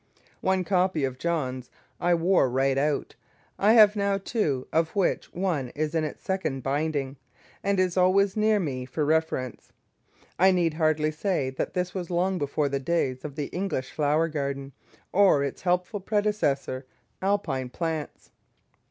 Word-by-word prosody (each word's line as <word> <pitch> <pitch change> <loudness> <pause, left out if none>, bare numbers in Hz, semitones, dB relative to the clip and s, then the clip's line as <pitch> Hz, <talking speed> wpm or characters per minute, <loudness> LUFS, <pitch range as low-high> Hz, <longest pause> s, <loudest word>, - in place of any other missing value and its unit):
One 190 -1 +1
copy 180 -4 +1
of 130 -1 -2
"Johns" 130 -7 -2 0.3
I 175 0 +3
wore 170 -4 +3
right 135 +2 +1
out; 145 +1 0 0.5
I 210 +3 +5
have 215 -2 +7
now 200 -1 +1
two, 170 - -1
of 165 +3 +1
which 195 -3 0
one 170 -9 -1
is 155 +1 -1
in 160 -1 +1
its 155 - -5
second 170 -9 -2
binding, 140 0 -1 0.5
and 200 -1 +1
is 185 -1 +1
always 190 +2 +3
near 215 0 +3
me 130 -8 -3
for 150 +3 -1
reference. 155 -5 -1 0.7
I 190 +2 +6
need 175 -4 +2
hardly 155 -1 +1
say 155 -4 -1
that 130 - -4
this 180 0 -1
was 180 -3 -4
long 180 +1 0
before 145 0 0
the 140 0 -1
days 135 -4 -1
of 145 -2 -6
the 150 -2 -2
"English 180 -9 -2
Flower 155 +2 +1
Garden," 140 -3 -3 0.4
or 190 -7 +5
its 140 - -4
helpful 180 +3 0
predecessor, 195 -11 -1 0.3
"Alpine 175 -10 -1
Plants." 160 +1 -4
160 Hz, 155 wpm, -26 LUFS, 140-190 Hz, 0.7 s, have